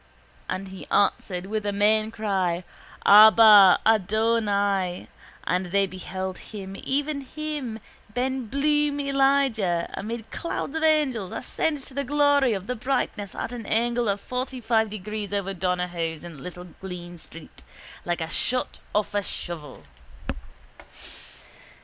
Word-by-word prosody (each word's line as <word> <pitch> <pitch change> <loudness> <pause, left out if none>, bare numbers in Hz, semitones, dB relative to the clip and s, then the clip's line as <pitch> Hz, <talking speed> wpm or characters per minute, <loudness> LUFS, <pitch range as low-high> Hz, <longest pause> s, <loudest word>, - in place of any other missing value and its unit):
_ - - -31 0.5
And 195 +1 -3
He 190 0 -10
answered 185 -2 +1
with 215 +1 -3
a 205 - -1
main 215 +2 +3
cry: 190 -6 -1 0.4
Abba! 210 -2 +9
Adonai! 205 -3 +1 0.4
And 180 +1 0
they 195 +2 +2
beheld 185 0 -5
Him 195 -2 -8
even 285 +1 -1
Him, 285 -4 -5 0.3
ben 255 +1 -2
Bloom 295 +3 +1
Elijah, 270 -10 +1
amid 225 +1 -5
clouds 330 -3 -4
of 320 - -1
angels 280 - +2
ascend 295 -4 -2
to 265 - -10
the 280 +1 -2
glory 285 -2 +3
of 195 -2 -4
the 250 +3 -3
brightness 220 -5 -2
at - - -4
an 235 -3 -7
angle 235 0 +1
of 200 0 0
fortyfive 240 -2 -1
degrees 210 0 -5
over 200 -1 -2
Donohoe's 180 -3 -2
in 165 -5 -10
Little 180 +1 -8 0.2
Green 175 -2 -7
street 155 - -12 0.4
like 175 -1 -2
a 160 - -2
shot 255 +9 -1 0.2
off 210 -1 0
a 205 - +1
shovel. 160 - -6
210 Hz, 130 wpm, -25 LUFS, 185-255 Hz, 0.5 s, Abba